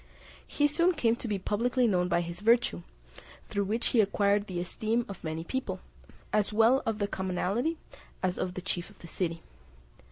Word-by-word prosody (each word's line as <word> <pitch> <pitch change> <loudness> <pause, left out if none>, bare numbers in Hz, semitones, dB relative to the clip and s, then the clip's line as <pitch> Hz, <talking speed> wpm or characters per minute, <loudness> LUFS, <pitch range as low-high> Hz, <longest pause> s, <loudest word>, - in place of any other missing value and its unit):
He 290 - +1
soon 340 +5 +3
came 230 -5 +2
to 235 - -6
be 210 -2 0
publicly 240 +6 +1
known 180 -5 +2
by 175 - +2
his 170 0 -6
virtue, 220 - +3 0.7
through 200 -1 0
which 225 +4 0
he 235 - +5
acquired 205 0 +2
the 180 -2 -3
esteem 220 +6 -1
of 200 -3 -9
many 160 0 -3
people, 260 +9 -3 0.5
as 210 -1 +2
well 225 +5 +5
of 225 -1 0
the 205 -1 0
commonalty 195 - -1 0.5
as 185 -1 0
of 180 -1 -2
the 185 - -5
chief 180 -1 -3
of 205 - -18
the 170 - -12
city. 165 -1 -3
205 Hz, 185 wpm, -30 LUFS, 180-235 Hz, 0.7 s, he